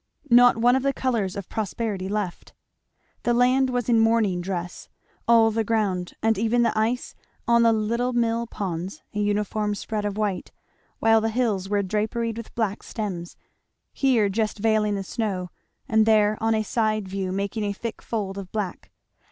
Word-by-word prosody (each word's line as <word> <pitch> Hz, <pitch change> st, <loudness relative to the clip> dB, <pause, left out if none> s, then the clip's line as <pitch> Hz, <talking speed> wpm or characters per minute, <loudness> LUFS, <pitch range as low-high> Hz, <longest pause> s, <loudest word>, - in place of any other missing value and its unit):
Not 245 Hz, 0 st, +7 dB
one 240 Hz, +2 st, +4 dB
of 265 Hz, -, +1 dB
the 275 Hz, +1 st, +1 dB
colours 230 Hz, -9 st, -1 dB
of 200 Hz, -3 st, -6 dB
prosperity 210 Hz, -2 st, -3 dB
left. 205 Hz, -4 st, -4 dB, 0.7 s
The 240 Hz, 0 st, +1 dB
land 255 Hz, +2 st, +3 dB
was 245 Hz, -2 st, -1 dB
in 235 Hz, -2 st, +4 dB
mourning 225 Hz, -5 st, +2 dB
dress; 175 Hz, -1 st, -5 dB, 0.4 s
all 230 Hz, -1 st, +5 dB
the 225 Hz, +1 st, 0 dB
ground 200 Hz, -5 st, -1 dB
and 225 Hz, -2 st, +2 dB
even 235 Hz, +2 st, +2 dB
the 230 Hz, -, +1 dB
ice 225 Hz, +3 st, -1 dB, 0.3 s
on 235 Hz, 0 st, +5 dB
the 230 Hz, -1 st, +5 dB
little 230 Hz, +3 st, 0 dB
mill 235 Hz, -1 st, 0 dB
ponds 185 Hz, -3 st, -5 dB
a 210 Hz, -, -3 dB
uniform 210 Hz, 0 st, 0 dB
spread 210 Hz, +1 st, -4 dB
of 205 Hz, 0 st, -3 dB
white, 205 Hz, -3 st, -2 dB, 0.5 s
while 225 Hz, 0 st, +4 dB
the 225 Hz, -, 0 dB
hills 215 Hz, -5 st, -1 dB
were 205 Hz, -1 st, +1 dB
draperied 220 Hz, +3 st, -1 dB
with 230 Hz, -, -9 dB
black 215 Hz, -3 st, -1 dB
stems, 185 Hz, -6 st, -5 dB, 0.6 s
here 250 Hz, -7 st, +3 dB
just 215 Hz, +2 st, -1 dB
veiling 215 Hz, -1 st, +1 dB
the 195 Hz, -, -3 dB
snow, 190 Hz, -3 st, -3 dB, 0.4 s
and 220 Hz, 0 st, +3 dB
there 215 Hz, -1 st, +4 dB
on 225 Hz, 0 st, +2 dB
a 215 Hz, -, 0 dB
side 215 Hz, -2 st, 0 dB
view 190 Hz, -1 st, -3 dB
making 200 Hz, +3 st, -2 dB
a 205 Hz, -, -1 dB
thick 225 Hz, +3 st, -6 dB
fold 200 Hz, -4 st, -3 dB
of 190 Hz, -2 st, -9 dB
black. 205 Hz, -5 st, -4 dB
215 Hz, 175 wpm, -24 LUFS, 200-230 Hz, 0.7 s, Not